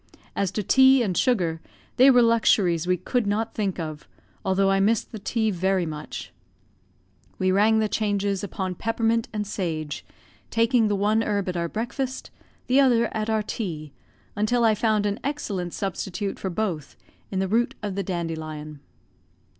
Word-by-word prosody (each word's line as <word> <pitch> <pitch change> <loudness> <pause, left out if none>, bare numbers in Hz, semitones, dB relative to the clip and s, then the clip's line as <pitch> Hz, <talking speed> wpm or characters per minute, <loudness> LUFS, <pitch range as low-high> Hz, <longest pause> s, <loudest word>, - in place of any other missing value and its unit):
As 195 - 0
to 210 - -2
tea 265 +4 +6
and 190 -5 -1
sugar, 175 -11 +1 0.4
they 260 +2 +8
were 245 -2 +6
luxuries 195 -7 +3
we 180 0 +2
could 245 +3 -1
not 220 +2 -1
think 195 -4 -2
of, 155 -2 -6 0.4
although 195 +1 +2
I 195 - +3
missed 210 +3 +1
the 220 - -7
tea 220 +1 0
very 185 0 +1
much; 155 -2 -7 1.0
we 185 0 +1
rang 210 +3 +4
the 220 -1 +2
changes 205 -2 -1
upon 190 -2 -3
peppermint 225 +4 0
and 210 -1 -3
sage, 160 -7 -4 0.5
taking 230 0 +3
the 205 - +1
one 210 +3 +2
herb 205 -3 -1
at 180 - -3
our 170 -1 -1
breakfast, 255 +5 -4 0.3
the 260 +2 +3
other 240 -4 +3
at 215 0 -2
our 220 -1 +1
tea, 160 -10 -5 0.4
until 225 +4 +1
I 225 -1 +5
found 215 -1 +1
an 205 +1 -1
excellent 205 -11 -3
substitute 195 +1 -4
for 190 - -3
both 175 -6 -3 0.3
in 190 - -4
the 190 0 +1
root 235 +5 +1
of 205 -2 -2
the 200 - -2
dandelion. 160 -5 -5
205 Hz, 165 wpm, -25 LUFS, 180-225 Hz, 1.0 s, they